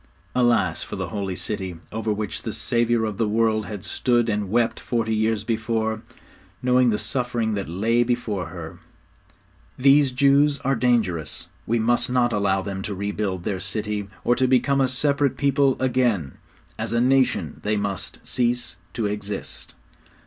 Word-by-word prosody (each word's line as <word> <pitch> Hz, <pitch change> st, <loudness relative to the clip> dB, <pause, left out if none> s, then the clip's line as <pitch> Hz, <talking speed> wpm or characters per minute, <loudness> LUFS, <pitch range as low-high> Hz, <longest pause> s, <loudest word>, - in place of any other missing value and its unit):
Alas 120 Hz, -9 st, +2 dB
for -, -, -5 dB
the -, -, -4 dB
Holy 100 Hz, -3 st, -3 dB
City, 95 Hz, -2 st, -3 dB, 0.2 s
over 110 Hz, 0 st, -2 dB
which 105 Hz, -1 st, -3 dB
the 110 Hz, -, -4 dB
Saviour 115 Hz, +2 st, +1 dB
of 105 Hz, -3 st, -4 dB
the 115 Hz, -, +2 dB
world 110 Hz, 0 st, +1 dB
had 105 Hz, -2 st, -7 dB
stood 120 Hz, 0 st, +1 dB
and 105 Hz, -2 st, -1 dB
wept 115 Hz, +2 st, +1 dB
forty 115 Hz, -2 st, -1 dB
years 110 Hz, -1 st, +1 dB
before, 110 Hz, -1 st, -1 dB, 0.6 s
knowing 125 Hz, 0 st, +4 dB
the 105 Hz, -, +1 dB
suffering 120 Hz, -4 st, -1 dB
that 100 Hz, -5 st, -3 dB
lay 110 Hz, +7 st, +1 dB
before 115 Hz, -7 st, -1 dB
her! 80 Hz, -1 st, -8 dB, 1.0 s
'These 140 Hz, +1 st, +5 dB
Jews 140 Hz, +2 st, +4 dB
are 135 Hz, -1 st, +1 dB
dangerous. 110 Hz, -10 st, 0 dB, 0.2 s
We 115 Hz, -, +2 dB
must 120 Hz, +2 st, +1 dB
not 125 Hz, -1 st, +2 dB
allow 95 Hz, -2 st, +1 dB
them 95 Hz, -1 st, -4 dB
to 100 Hz, 0 st, -4 dB
rebuild 100 Hz, -2 st, -2 dB
their 95 Hz, -1 st, -2 dB
city, 105 Hz, +1 st, -3 dB, 0.2 s
or 120 Hz, -, +3 dB
to 130 Hz, -, +3 dB
become 135 Hz, +2 st, +3 dB
a 130 Hz, -, +3 dB
separate 140 Hz, 0 st, +1 dB
people 140 Hz, -1 st, +2 dB
again. 120 Hz, -, +1 dB, 0.5 s
As 110 Hz, +1 st, -3 dB
a 115 Hz, -, +2 dB
nation 125 Hz, -, +2 dB
they 105 Hz, 0 st, 0 dB
must 100 Hz, -2 st, -3 dB
cease 120 Hz, 0 st, 0 dB, 0.2 s
to 115 Hz, -, -2 dB
exist.' 105 Hz, -1 st, -5 dB
110 Hz, 160 wpm, -23 LUFS, 100-125 Hz, 1.0 s, These